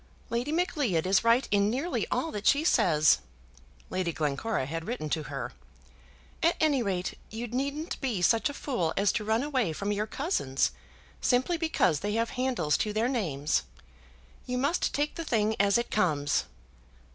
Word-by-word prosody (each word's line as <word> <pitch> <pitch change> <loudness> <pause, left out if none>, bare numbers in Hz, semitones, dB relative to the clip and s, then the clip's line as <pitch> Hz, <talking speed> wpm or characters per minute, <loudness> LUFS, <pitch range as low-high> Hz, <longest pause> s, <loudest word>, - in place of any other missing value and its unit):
"Lady 240 +5 -1
Macleod 290 - 0
is 190 +3 +3
right 230 +3 +4
in 205 0 +3
nearly 275 +10 -1
all 325 - -1
that 210 0 -3
she 285 +2 +4
says," 155 - +4 0.7
Lady 185 -2 -1
Glencora 155 +3 -1
had 165 +4 -5
written 185 - -4
to 160 - +1
her. - - -5 0.9
"At 335 +1 +3
any 295 -4 +3
rate, 190 -4 -2
you 225 +3 -5
needn't 280 +7 -3
be 230 -10 -1
such 230 +7 +3
a - - -5
fool 180 - -2
as 200 -1 +3
to 215 - -2
run 220 +4 +1
away 260 - 0
from 200 +6 -2
your 210 +1 -1
cousins, 245 - 0 0.5
simply 255 +8 +2
because 320 - +1
they 205 +1 -2
have 230 +1 0
handles 250 - 0
to 210 - -1
their 220 +3 +1
names. 160 - 0 0.9
You 250 0 -1
must 280 +7 +1
take 295 +1 -1
the 330 - -5
thing 220 -6 +1
as 200 +1 +4
it 235 - -2
comes." 150 -8 +1
225 Hz, 170 wpm, -29 LUFS, 180-270 Hz, 0.9 s, right